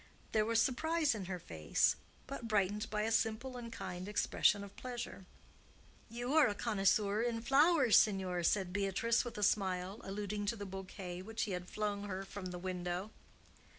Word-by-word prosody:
There 215 -1 +2
was 230 0 +3
surprise 310 +5 +2
in 205 -4 -5
her 185 0 -3
face, 80 - +1 0.3
but 255 -3 -6
brightened 210 0 +1
by 210 0 -1
a 225 - 0
simple 225 +3 0
and 235 -2 -7
kind 185 -3 -6
expression 205 0 +2
of 200 0 -11
pleasure. 240 -6 -6 0.8
"You 245 +4 -3
are 315 -1 +6
a 205 - -1
connoisseur 205 -1 +2
in 235 -1 0
flowers, 280 -2 +5
signor," 190 -4 +1
said 185 +1 +1
Beatrice, 205 +4 +1
with 240 -3 -7
a 210 - -2
smile, 190 0 +1
alluding 205 +1 -3
to 230 - +1
the 205 -2 -6
bouquet 185 -1 -6
which 225 +4 -3
he 210 - -3
had 180 0 -4
flung 205 -1 -2
her 195 -1 -4
from 195 0 -7
the 180 -1 -4
window. 180 +2 -3
205 Hz, 175 wpm, -35 LUFS, 190-230 Hz, 0.8 s, are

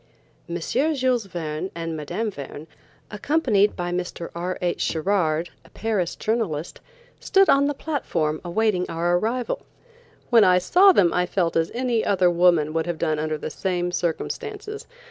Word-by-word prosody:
M. 170 - -3
JULES 255 - 0
VERNE 165 0 -4
and 165 -1 -4
Mme. 160 +9 -3
Verne, 145 -2 -8 0.5
accompanied 210 -3 +2
by 175 -1 -3
Mr. 175 -1 -4
R. 180 +2 -3
H. 175 -1 -1
Sherard, 165 -1 0
a - - -19
Paris 210 -6 -2
journalist, 195 -9 -2 0.4
stood 390 0 +3
on 280 +1 +4
the 290 - -1
platform 165 - -2
waiting 185 0 0
our 175 +2 +1
arrival. 235 +4 -2 0.7
When 230 -3 +7
I 180 -1 +5
saw 360 - +6
them 180 - +3
I 180 0 +1
felt 175 -3 0
as 165 0 +1
any 245 -2 0
other 185 -3 +3
woman 170 -3 +3
would 165 +1 -1
have 175 -2 -2
done 155 0 0
under 155 0 -2
the 155 - -6
same 180 -1 -2
circumstances. 425 - -4
180 Hz, 155 wpm, -23 LUFS, 165-230 Hz, 0.7 s, When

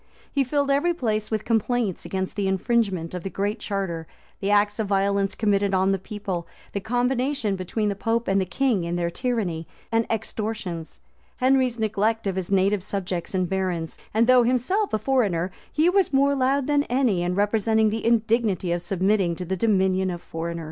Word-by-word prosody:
He 280 - +2
filled 280 +2 0
every 335 +5 +2
place 215 -7 -1
with 215 -1 -2
complaints 230 -3 0
against 190 -1 -3
the 200 -2 0
infringement 190 -3 0
of 180 - -4
the 195 - -4
Great 205 +4 -2
Charter, 190 -6 -3 0.3
the 195 - -2
acts 205 +1 +3
of 215 - 0
violence 200 0 +1
committed 200 -2 +1
on 190 +1 +3
the 195 - 0
people, 190 -3 -5 0.3
the 200 - -1
combination 245 0 0
between 190 +4 -2
the 200 - -1
pope 230 +3 -1
and 195 0 +2
the 185 - -2
king 220 0 +1
in 170 +1 -2
their 170 -1 -1
tyranny 195 -8 -2 0.2
and 225 0 +1
extortions, 215 -6 -4 0.4
Henry's 255 -2 +2
neglect 220 0 0
of 195 -2 -1
his 190 -2 -3
native 195 +1 +3
subjects 190 -2 -3
and 185 -1 +1
barons; 180 -3 -2 0.2
and 225 +2 +3
though 255 0 +6
himself 255 - +1
a - - +2
foreigner, 205 -7 +1 0.2
he 310 +3 +2
was 380 -1 +3
more 280 +1 +3
loud 270 0 +1
than 290 0 +2
any 245 -8 +1
in 175 +1 -1
representing 215 +1 +2
the 225 +1 -3
indignity 225 -5 +1
of 175 0 0
submitting 190 0 +1
to 180 - -5
the 190 +2 -1
dominion 190 -2 +2
of 175 -1 -4
foreigners. 170 0 -5
205 Hz, 185 wpm, -24 LUFS, 185-235 Hz, 0.4 s, though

